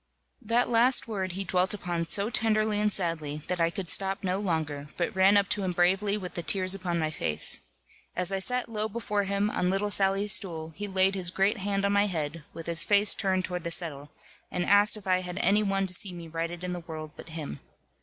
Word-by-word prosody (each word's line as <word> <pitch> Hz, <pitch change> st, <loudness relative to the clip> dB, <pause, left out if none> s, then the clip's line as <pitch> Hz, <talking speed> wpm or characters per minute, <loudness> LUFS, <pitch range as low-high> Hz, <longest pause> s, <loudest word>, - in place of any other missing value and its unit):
That 235 Hz, +2 st, +1 dB
last 245 Hz, +2 st, +3 dB
word 190 Hz, -5 st, -3 dB
he 195 Hz, +2 st, -3 dB
dwelt 185 Hz, +2 st, +1 dB
upon 175 Hz, -3 st, -3 dB
so 200 Hz, +6 st, +1 dB
tenderly 215 Hz, -2 st, +1 dB
and 210 Hz, 0 st, +1 dB
sadly, 160 Hz, -6 st, -1 dB
that 180 Hz, -2 st, -2 dB
I 165 Hz, -, +3 dB
could 180 Hz, +1 st, -6 dB
stop 195 Hz, +3 st, 0 dB
no 185 Hz, +1 st, -1 dB
longer, 155 Hz, -7 st, -2 dB
but 175 Hz, -, -2 dB
ran 190 Hz, +2 st, +5 dB
up 200 Hz, -1 st, +2 dB
to 210 Hz, -, 0 dB
him 185 Hz, -1 st, -1 dB
bravely 190 Hz, +4 st, +2 dB
with 185 Hz, -3 st, -7 dB
the 175 Hz, -, -3 dB
tears 185 Hz, +2 st, +2 dB
upon 180 Hz, -3 st, -2 dB
my 155 Hz, -1 st, -1 dB
face. 75 Hz, -, +2 dB, 0.6 s
As 180 Hz, +1 st, 0 dB
I 195 Hz, -, -1 dB
sat 250 Hz, +6 st, +1 dB
low 215 Hz, -1 st, -3 dB
before 210 Hz, -2 st, -2 dB
him, 200 Hz, +2 st, 0 dB
on 180 Hz, -, 0 dB
little 200 Hz, +2 st, 0 dB
Sally's 195 Hz, +2 st, +2 dB
stool, 165 Hz, -5 st, 0 dB
he 205 Hz, +6 st, -6 dB
laid 190 Hz, 0 st, +2 dB
his 185 Hz, -3 st, -1 dB
great 195 Hz, +4 st, 0 dB
hand 200 Hz, 0 st, -1 dB
on 200 Hz, -, +1 dB
my 200 Hz, +1 st, +3 dB
head, 160 Hz, -3 st, -4 dB
with 165 Hz, -, -9 dB
his 170 Hz, -1 st, +4 dB
face 205 Hz, 0 st, +4 dB
turned 190 Hz, -2 st, 0 dB
toward 180 Hz, -2 st, -5 dB
the 170 Hz, -, -3 dB
settle, 155 Hz, -4 st, -4 dB, 0.4 s
and 180 Hz, -1 st, -2 dB
asked 205 Hz, +2 st, +5 dB
if 205 Hz, -, -12 dB
I 185 Hz, -1 st, +2 dB
had 180 Hz, 0 st, -6 dB
any 200 Hz, +4 st, +2 dB
one 195 Hz, -1 st, 0 dB
to 185 Hz, -, -6 dB
see 185 Hz, +1 st, +3 dB
me 170 Hz, -1 st, -9 dB
righted 165 Hz, +2 st, -5 dB
in 180 Hz, 0 st, -3 dB
the 175 Hz, -, -4 dB
world 155 Hz, -2 st, -8 dB
but -, -, -12 dB
him. 155 Hz, -, -6 dB
190 Hz, 230 wpm, -28 LUFS, 170-205 Hz, 0.6 s, ran